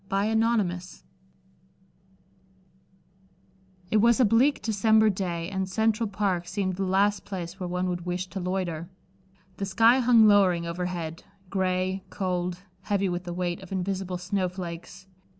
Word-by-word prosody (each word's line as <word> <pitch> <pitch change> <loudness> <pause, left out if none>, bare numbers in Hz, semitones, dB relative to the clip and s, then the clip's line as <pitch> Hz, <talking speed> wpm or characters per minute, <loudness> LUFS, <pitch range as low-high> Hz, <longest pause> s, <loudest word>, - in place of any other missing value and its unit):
Chapter 200 +2 +1
XXVII 190 -6 -1 2.9
It 220 - +4
was 235 +3 +4
a 255 - +6
bleak 240 +7 +3
December 220 0 +3
day 175 -3 -3
and 190 -1 -2
Central 220 +2 +1
Park 190 -4 -1
seemed 185 0 -2
the 195 - -1
last 200 +2 +2
place 180 -1 -6
where 180 - -3
one 180 +1 -1
would 175 -1 -4
wish 180 +1 -2
to 195 - -5
loiter. 180 -2 -3 0.7
The 200 - -2
sky 225 +6 +5
hung 235 -3 +6
lowering 185 -5 +4
overhead, 170 -1 -4 0.3
gray, 185 0 0
cold, 180 -1 -3 0.2
heavy 200 -1 0
with 175 0 -3
the 175 - -4
weight 175 -1 -2
of 190 - -12
invisible 190 -1 -2
snowflakes. 180 -1 -4
190 Hz, 135 wpm, -26 LUFS, 180-205 Hz, 2.9 s, a